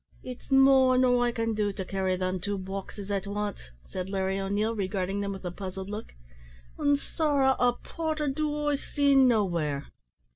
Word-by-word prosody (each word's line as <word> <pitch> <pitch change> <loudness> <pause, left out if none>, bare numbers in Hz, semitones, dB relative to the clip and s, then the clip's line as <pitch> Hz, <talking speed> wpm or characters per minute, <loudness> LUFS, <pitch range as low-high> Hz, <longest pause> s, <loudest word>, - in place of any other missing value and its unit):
"It's 250 -1 -9
more 270 -1 +6
nor 245 -1 +4
I - - +1
can 230 -1 -1
do 210 -1 0
to 190 -1 -5
carry 190 -1 -1
them 185 0 -2
two 200 +3 -2
boxes 195 +1 -6
at 200 -1 -2
wance," 205 - -4 0.2
said 185 0 -5
Larry 190 0 -1
O'Neil, 205 +3 0
regarding 195 -1 -2
them 200 0 -2
with 195 -1 -7
a 175 - -2
puzzled 190 +1 -6
look, 215 +2 -6 0.7
"an' 285 0 +3
sorra 280 -2 +1
a 245 0 +4
porter 310 +3 -3
do 295 +1 -1
I - - +2
see 285 0 +1
nowhere." 180 - +2
210 Hz, 175 wpm, -28 LUFS, 190-265 Hz, 0.7 s, more